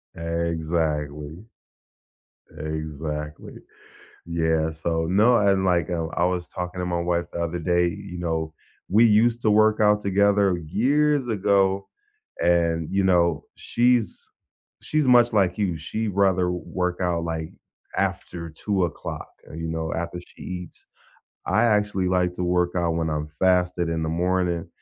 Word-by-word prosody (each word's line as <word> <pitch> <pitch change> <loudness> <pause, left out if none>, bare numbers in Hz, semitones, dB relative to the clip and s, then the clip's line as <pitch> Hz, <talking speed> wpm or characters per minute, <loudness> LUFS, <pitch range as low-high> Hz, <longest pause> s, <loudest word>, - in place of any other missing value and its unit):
Exactly. 80 -1 -2 1.1
Exactly, 75 -1 -5 0.7
yeah, 80 -1 0
so 80 +1 -2
no, 110 +6 +5
and, 100 -2 +2
like, 90 -3 +1
I - - 0
w 80 -1 -3
I 85 - +2
was 90 -1 -1
talking 90 0 -6
to 90 - -2
my 85 -1 -1
wife 85 0 0
the 85 - -4
other 85 +1 -2
day, 85 +1 +2
you 90 +1 -7
know, 80 -2 -3 0.3
we 110 +5 +5
used 115 +2 +3
to 110 - +3
work 110 +1 +4
out 105 0 +4
together 100 -1 +2
years 130 - +1
ago, 100 -2 +1 0.5
and, 85 -2 +2
you 95 0 +1
know, 85 -4 +2
she's 120 -1 +1 0.6
she's 155 -3 0
much 120 -1 +6
like 95 -4 +2
you, 95 -5 0
she'd 105 +6 -3
rather 95 -2 +2
work 90 +1 -3
out 85 -2 0
like 80 -1 -4 0.5
after 85 -1 -3
2 95 +4 -1
o'clock, 85 - -6 0.2
uh, - - -9
you 80 0 -4
know, 80 0 -3
after 85 +1 -4
she - - -21
eats, 90 -1 -8 0.6
I - - +2
actually 105 -4 +1
like 90 -1 +1
to 90 - -3
work 90 0 +1
out 85 -2 +1
when 80 -1 -1
I'm 75 0 -2
fasting 90 +1 +1
in 80 0 -2
the 80 - -2
morning, 90 0 0
90 Hz, 150 wpm, -24 LUFS, 80-100 Hz, 1.1 s, much